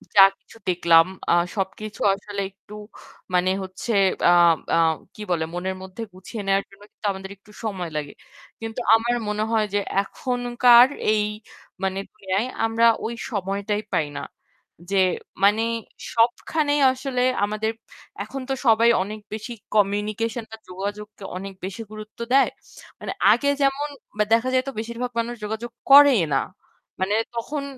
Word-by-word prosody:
যা 195 - +9 0.2
কিছু - - -18
দেখলাম 170 -2 +5 0.3
আহ 175 0 +4
সবকিছু 205 +2 -4
আসলে 200 0 -5
একটু 200 +1 -17 0.6
মানে 180 +1 +3
হচ্ছে 190 +5 -5 0.4
আ - - +7 0.4
আ - - +3 0.4
কি 215 - -10
বলে 160 -2 +1
মনের 185 +2 -3
মধ্যে 190 +4 -9
গুছিয়ে 190 +4 -8
নেওয়ার 195 0 +2
জন্য 195 +1 -19
কিন্তু - - -12
আমাদের 190 0 -7
একটু 205 +2 -20
সময় 185 -5 -3
লাগে। 145 -1 -4 0.5
কিন্তু 225 +2 -5 0.2
আমার 240 +2 +1
মনে 210 +1 -1
হয় 220 -2 +2
যে 205 - +3 0.2
এখনকার 245 +2 +4 0.3
এই 210 -1 +2 0.6
মানে 190 0 -1
দুনিয়ায় 200 +1 -2 0.2
আমরা 225 +1 +2 0.2
ওই 235 - -3 0.2
সময়টাই 200 0 -2
পাই 155 -2 +1
না। - - -6 0.7
যে 195 - +2 0.5
মানে 210 +3 +5 0.5
সবখানেই 290 +5 +1
আসলে 260 -1 -3 0.2
আমাদের 215 +1 -2 0.5
এখন 265 +6 -7
তো - - +1
সবাই 230 +1 +5
অনেক 215 +2 -7
বেশি 220 +3 -5 0.2
communication 215 +3 0
বা 220 - -8
যোগাযোগকে 205 +2 -6
অনেক 195 +1 -7
বেশি 195 +4 -6
গুরুত্ব 215 +1 -10
দেয়। 275 - +5 0.5
মানে - - -5 0.2
আগে 280 - +3
যেমন 275 +2 +1 0.3
বা 210 - +4
দেখা 230 +3 +3
যায়তো 260 +1 +1
বেশিরভাগ 235 +2 -4
মানুষ 235 +1 -2
যোগাযোগ 220 +2 -4 0.2
করেই 280 -7 +9
না। 135 - +3 0.6
মানে 195 +3 +1 0.2
তখন 280 +5 -3
215 Hz, 145 wpm, -23 LUFS, 195-235 Hz, 0.7 s, যা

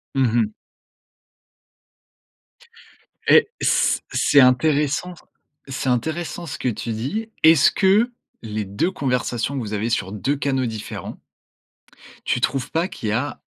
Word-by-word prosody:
Mmh 130 -4 +2
mh. 115 -3 +3 2.8
Et - - +6
c - - +2
c'est 145 - +4
intéressant 145 +6 +2
s 175 - -17 0.5
c'est 130 0 -2
intéressant 160 +7 -2
ce 150 - -6
que 125 - 0
tu 115 0 -4
dis. 145 - -4
Est-ce 160 -2 +6
que 210 +5 +3 0.3
les 110 -1 -4
2 100 - -1
conversations 125 -4 -2
que - - -2
vous 110 -3 -5
avez 105 +2 -1
sur 95 -5 -1
2 135 +7 -1
canaux 135 -2 0
différents 110 -2 -6 1.1
tu 125 - 0
trouves 135 -1 -1
pas 165 +3 0
qu'il 110 - -5
y - - 0
a 130 +7 -2
130 Hz, 135 wpm, -22 LUFS, 115-160 Hz, 2.8 s, Et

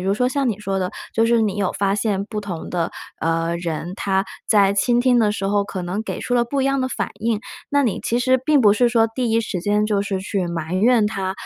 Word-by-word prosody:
如 190 +2 0
说 250 +4 +1
像 270 0 0
你 210 - -2
说 195 -2 -3
的， 185 0 -1 0.2
就 225 - +3
是 235 0 +3
你 210 -3 0
有 195 -2 0
发 195 -1 0
现 200 -2 -1
不 215 0 -5
同 185 -5 -6
的， 170 -2 -1 0.3
呃， 165 +1 0
人， 170 0 -4
他 195 -1 0 0.2
在 200 -2 +4
倾 240 +5 +2
听 245 -1 +4
的 215 -2 +3
时 205 -2 -3
候， 200 0 +2
可 195 -2 -5
能 180 +5 -3
给 - - -5
出 245 - -2
了 240 -1 +3
不 275 +4 -2
一 - - +1
样 275 0 +1
的 260 - 0
反 200 -6 -3
应。 225 0 0 0.3
那 285 -1 +2
你 225 - -1
其 235 - 0
实 255 +1 +2
并 300 -1 +4
不 210 -4 +6
是 240 +3 +3
说， 230 -1 +3
第 245 -2 -1
一 225 +1 +3
时 195 -5 -4
间 210 +3 +1
就 205 -2 +1
是 200 -1 -2
去 190 -2 -2
埋 165 -1 -4
怨 230 -1 +4
他， 195 -3 -2
210 Hz, 280 characters per minute, -21 LUFS, 195-235 Hz, 0.3 s, 不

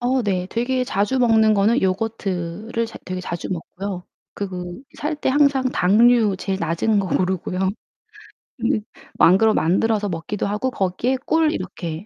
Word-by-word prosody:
어 250 +1 +1
네. 185 -4 -1
되게 250 +2 0
자주 210 +4 0
먹는 220 -3 +4
거는 210 +5 +3
요거트를 200 +2 -2
자 225 - -10
되게 185 0 -4
자주 170 -1 -5
먹고요. 185 +1 -5 0.3
그 200 - -4
그 180 +3 -7 0.2
살 300 +1 -2
때 295 - -2
항상 280 -1 +3
당류 225 -1 +4
제일 190 -1 -2
낮은 170 +6 +1
거 190 - -3
고르고요. 185 0 -1 1.0
근데 235 -2 0 0.4
만그러 215 +5 +5
만들어서 205 +5 +1
먹기도 170 +5 -3
하고 210 +6 -1
거기에 230 +6 -1
꿀 320 -1 +3
이렇게 170 -1 -5
210 Hz, 300 characters per minute, -21 LUFS, 185-240 Hz, 1.0 s, 만그러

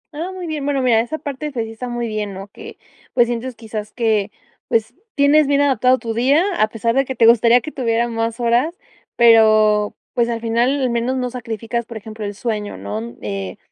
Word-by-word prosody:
Ah, 335 +5 -4
muy 370 -1 -7
bien, 310 -3 -4
bueno, 275 -2 0
mira, 235 -3 +4
esa 240 +7 -4
parte, 290 0 -5
pues 235 -4 -3
si 225 - -8
está 245 +3 -6
muy 240 -1 -3
bien, 210 -2 -4
¿no?, 195 +1 -8
que 440 - -11 0.4
pues 240 - +5
sientes 240 +1 -4
quizás 215 -2 -7
que 220 -4 +1 0.4
pues 225 0 0 0.2
tienes 290 +1 +4
bien 285 0 +3
adaptado 260 -2 +3
tu 230 -3 -4
día, 270 +8 +3 0.2
a 215 - +4
pesar 225 +1 -1
de 270 +2 +3
que 265 -1 -5
te 230 - +4
gustaría 235 +1 +6
que 305 - -7
tuviera 235 -3 0
más 230 0 -2
horas, 245 +8 +1 0.4
pero 215 -3 +5 0.2
pues 235 -1 +1
al 230 -1 -2
final 235 +5 +1
al 255 - +1
menos 235 +3 -1
no 250 -1 -2
sacrificas, 235 -1 -4
por 230 - -7
ejemplo, 215 0 -8
el 205 0 -5
sueño, 210 - -3
¿no?, 105 +5 -6
eh, 100 -2 -4
235 Hz, 210 wpm, -19 LUFS, 220-260 Hz, 0.4 s, gustaría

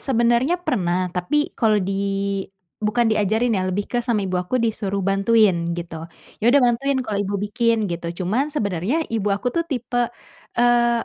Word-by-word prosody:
sebenarnya 240 +5 +2
pernah, 180 - 0
tapi 295 +12 0
kalau 220 -2 +2
di 195 -1 -1 0.9
bukan 220 +1 +2
diajarin 220 +3 +1
ya 185 -3 0
lebih 200 +2 -1
ke 245 - -1
sama 230 -4 0
ibu 180 -1 -1
aku 180 +8 -2
disuruh 210 -5 -1
bantuin 195 -3 +3
gitu, 165 -1 -7 0.3
"Ya - - -4
udah 280 +3 +6
bantuin, 265 +3 +1
kalau 210 -2 -2
ibu 200 0 -2
bikin." 220 +2 0
gitu, 170 0 -4 0.2
cuman 240 +11 0
sebenarnya 230 - -1
ibu 210 -2 0
aku 200 +5 -1
tuh 335 0 -1
tipe, 245 -3 -1 0.5
eee, 240 -1 +3
220 Hz, 165 wpm, -22 LUFS, 195-240 Hz, 0.9 s, udah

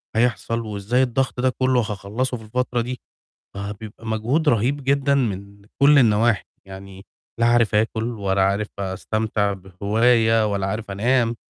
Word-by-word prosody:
هيحصل، 115 0 0
وإزاي 110 +4 0
الضغط 130 0 -1
ده 130 - +3
كلّه 130 -1 +3
هاخلّصه 105 +5 -3
في 110 - -12
الفترة 125 +2 -1
دي، 125 +2 -5 0.6
فبيبقى 105 +2 -8
مجهود 120 +9 +1
رهيب 130 +5 +1
جدًا 140 +1 +2
من 100 -5 -3 0.2
كلّ 145 +1 +7
النواحي، 115 -2 +3 0.2
يعني 95 0 -11 0.3
لا 115 - +3
عارف 120 -2 +3
آكُل 110 +1 +1 0.2
ولا 95 -1 0
عارف 100 +2 0
أستمتع 100 +2 -1
بهواية 110 +4 +2
ولا 100 -1 -1
عارف 105 +1 -4
أنام، 120 +3 +1
110 Hz, 140 wpm, -22 LUFS, 100-125 Hz, 0.6 s, كلّ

